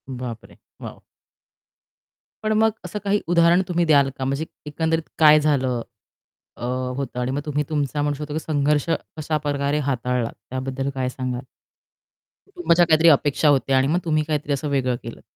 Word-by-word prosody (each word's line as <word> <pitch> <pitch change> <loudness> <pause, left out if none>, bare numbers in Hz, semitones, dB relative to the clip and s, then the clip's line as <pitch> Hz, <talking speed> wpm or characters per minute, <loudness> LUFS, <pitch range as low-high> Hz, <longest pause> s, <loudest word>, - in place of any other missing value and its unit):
बाप 125 -3 -6
रे! - - -18 0.2
वॉव! - - -9 1.4
पण 215 - 0
मग 220 0 +4
असं 195 +4 -5
काही 205 0 +1
उदाहरण 170 +1 +4
तुम्ही 175 -1 +1
द्याल 140 -4 +4
का? 130 - -2
म्हणजे 140 +4 -1 0.2
एकंदरीत 160 +2 -1
काय 155 -1 +7
झालं 130 -5 +1 0.8
अ, - - -5 0.3
होतं? 130 -2 -4
आणि 125 +1 -1
मग 140 +2 -2
तुम्ही 150 -1 -1
तुमचा 145 -1 -1
म्हणू 145 0 0
शकतो 150 +1 -6
की 155 - -1
संघर्ष 150 -2 0 0.3
कशाप्रकारे 145 -2 -1
हाताळलात, 125 -3 -1 0.2
त्याबद्दल 135 +1 -3
काय 130 -1 -1
सांगाल? 125 -1 -4 1.1
कुटुंबाच्या 355 - +2
काहीतरी 160 0 +5
अपेक्षा 145 0 +3
होत्या 135 -1 +3
आणि 130 +1 +3
मग 165 +5 +1
तुम्ही 155 -2 +1
काहीतरी 150 -2 -1
असं 140 +2 -2
वेगळं 130 -3 0
केलंत. 115 - -9
145 Hz, 160 wpm, -22 LUFS, 130-160 Hz, 1.4 s, काय